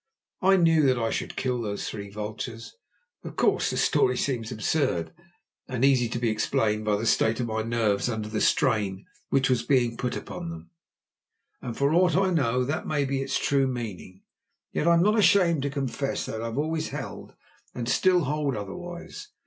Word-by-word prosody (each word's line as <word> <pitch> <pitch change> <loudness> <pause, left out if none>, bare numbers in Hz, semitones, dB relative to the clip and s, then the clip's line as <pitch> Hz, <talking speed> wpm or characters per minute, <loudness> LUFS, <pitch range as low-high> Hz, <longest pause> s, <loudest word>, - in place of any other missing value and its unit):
I 195 +1 +5
knew 165 -3 +4
that 130 -1 +3
I 115 -1 -1
should - - -3
kill 125 -2 -1
those 105 -2 -3
three 100 -2 -6
vultures. 110 +3 -6 0.5
Of - - -8
course - - +2
the - - -3
story 405 - +2
seems 120 -5 -2
absurd, 110 - -1 0.5
and 130 0 0
easy 130 -4 +3
to 120 - -3
be 120 -2 0
explained 110 -1 0
by 105 -1 +2
the 105 +3 -2
state 110 0 +2
of 125 - 0
my 110 -1 -2
nerves 115 -1 0
under 110 -2 -3
the 110 0 -2
strain 100 -4 +1 0.2
which 135 -1 +2
was 125 -2 +2
being 120 -2 +1
put 125 - -2
upon 85 - -6
them, 85 0 -9 0.9
and 120 -2 -6
for 140 +2 +2
aught 180 +1 +4
I 190 -1 +2
know 125 -7 +1
that 145 +5 -3
may 145 -2 0
be 135 0 -1
its 135 0 -1
true 140 -1 +2
meaning. 105 -7 -6 0.5
Yet 160 - -1
I 170 - +6
am 170 - +4
not 210 +3 +3
ashamed 180 -5 +4
to 140 - -1
confess 135 0 -2
that 110 - -5
I - - -3
have 115 +2 -4
always 160 +2 -1
held, - - -7 0.4
and 120 -2 -4
still 180 +7 +3
hold, 145 -1 -1
otherwise. 175 - -7
125 Hz, 190 wpm, -26 LUFS, 110-150 Hz, 0.9 s, I